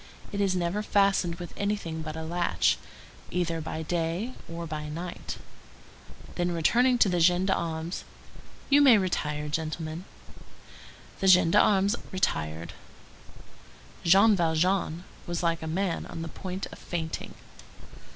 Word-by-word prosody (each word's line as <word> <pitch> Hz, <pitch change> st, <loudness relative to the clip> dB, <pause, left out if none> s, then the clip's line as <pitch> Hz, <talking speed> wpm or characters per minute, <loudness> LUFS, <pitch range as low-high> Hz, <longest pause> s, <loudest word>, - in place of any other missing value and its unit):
It 200 Hz, -, -2 dB
is 195 Hz, -2 st, +2 dB
never 180 Hz, +3 st, 0 dB
fastened 195 Hz, -4 st, +2 dB
with 175 Hz, 0 st, -8 dB
anything 200 Hz, -6 st, -2 dB
but 155 Hz, 0 st, -6 dB
a 160 Hz, -, -5 dB
latch, 170 Hz, +2 st, +1 dB, 0.5 s
either 170 Hz, -2 st, -1 dB
by 160 Hz, +1 st, -4 dB
day 175 Hz, +8 st, -2 dB, 0.2 s
or 170 Hz, 0 st, -5 dB
by 155 Hz, -1 st, -5 dB
night." 170 Hz, +3 st, -6 dB, 1.0 s
Then, 175 Hz, -1 st, -1 dB
turning 250 Hz, +6 st, +4 dB
to 225 Hz, -, +5 dB
the 180 Hz, -2 st, +1 dB
gendarmes:— 170 Hz, -1 st, +1 dB, 0.7 s
"You 285 Hz, +1 st, +7 dB
may 260 Hz, -6 st, +8 dB
retire, 150 Hz, -6 st, -1 dB
gentlemen." 160 Hz, +2 st, -4 dB, 1.1 s
The 195 Hz, -, +1 dB
gendarmes 190 Hz, +3 st, +5 dB, 0.2 s
retired. 80 Hz, -, -2 dB, 1.3 s
Jean 195 Hz, +5 st, +6 dB
Valjean 170 Hz, 0 st, +1 dB, 0.2 s
was 175 Hz, 0 st, -3 dB
like 165 Hz, -1 st, +1 dB
a 160 Hz, -, -5 dB
man 180 Hz, +2 st, -1 dB
on 165 Hz, -, -6 dB
the 165 Hz, -, -5 dB
point 190 Hz, 0 st, -5 dB
of -, -, -11 dB
fainting. 160 Hz, -2 st, -5 dB
175 Hz, 125 wpm, -28 LUFS, 160-190 Hz, 1.3 s, may